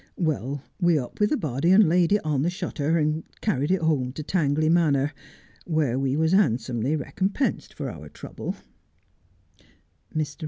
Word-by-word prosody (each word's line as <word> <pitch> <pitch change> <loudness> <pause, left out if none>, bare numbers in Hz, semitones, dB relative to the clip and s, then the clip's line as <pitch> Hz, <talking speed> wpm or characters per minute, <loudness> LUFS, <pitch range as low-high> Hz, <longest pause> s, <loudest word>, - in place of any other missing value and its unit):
"Well, 145 -4 -2 0.2
we 175 -3 +3
up 125 -4 -5
with 210 0 +3
the 300 - +1
body 145 - -1
and 195 +1 +7
laid 175 +1 +3
it 205 -4 +2
on 145 -3 +1
the 165 - +1
shutter, 170 -4 -1
and 155 0 0 0.2
carried 145 -9 0
it 190 -1 +2
home 135 -6 +1
to 155 - -6
Tangley 155 -2 +1
Manor, 150 -4 +2 0.5
where 150 -7 0
we 135 +1 0
was 160 +2 +2
'andsomely 125 - +1
recompensed 190 - -2
for - - -4
our - - -10
trouble. - - -6
155 Hz, 155 wpm, -25 LUFS, 140-175 Hz, 0.5 s, and